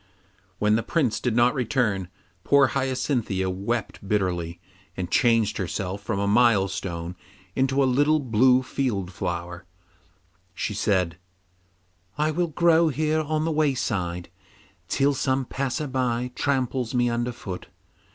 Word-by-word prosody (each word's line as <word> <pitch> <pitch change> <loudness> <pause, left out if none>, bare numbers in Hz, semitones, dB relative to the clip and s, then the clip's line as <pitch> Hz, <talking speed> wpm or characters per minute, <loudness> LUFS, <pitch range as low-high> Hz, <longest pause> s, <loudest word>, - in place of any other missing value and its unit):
When 105 +1 +3
the - - 0
Prince 130 -5 0
did 120 -3 -1
not 120 +1 +4
return, 115 -7 0 0.4
poor 140 -2 +5
Hyacinthia 125 -8 -1
wept 100 +1 -3
bitterly 90 -4 -1 0.4
and 90 -1 -4
changing 115 -3 +3
herself 95 +1 -3
from 100 -1 -2
a 100 - 0
milestone 95 -6 +1 0.4
into 135 +1 +2
a - - +4
little 145 +4 +3
blue 125 0 +3
field 105 -9 -2
flower, 85 -1 -4 0.9
she 105 - -2
said, 95 -4 0 1.0
'I 155 +1 +1
will 175 +3 0
grow 165 +1 +4
here 155 +1 +1
on 155 +1 -1
the 165 - 0
wayside 110 - -1 0.6
till 140 +8 +2
some 130 0 0
passer 135 +3 -2
by 125 -2 -1
tramples 130 -2 -1
me 120 0 +3
under 120 +1 -1
foot. 95 -6 -7
120 Hz, 130 wpm, -25 LUFS, 95-135 Hz, 1.0 s, poor